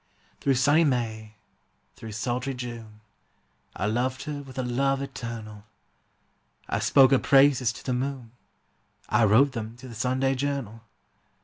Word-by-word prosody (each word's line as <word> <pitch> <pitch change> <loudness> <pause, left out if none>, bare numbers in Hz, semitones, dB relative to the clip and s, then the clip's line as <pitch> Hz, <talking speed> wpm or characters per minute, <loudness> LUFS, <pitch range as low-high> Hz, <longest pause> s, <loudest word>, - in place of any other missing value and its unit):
Through 135 -1 +1
sunny 145 +6 +4
May, 110 -6 -2 0.6
through 110 -1 -9
sultry 125 +4 -2
June, 115 -3 -8 0.7
I 95 - -2
loved 125 +4 -1
her 145 -1 -5
with 135 -2 -13
a 130 - -1
love 135 +3 0
eternal; 115 -6 -7 1.0
I - - -1
spoke 135 -1 +5
her 135 - +5
praises 135 -3 +4
to - - -12
the 130 - -1
moon, 130 -2 -4 0.8
I 115 - +4
wrote 120 +7 +5
them 115 -2 -6
to 130 - -11
the 120 - -10
Sunday 130 +4 0
Journal. 135 -5 -3
125 Hz, 140 wpm, -26 LUFS, 115-135 Hz, 1.0 s, spoke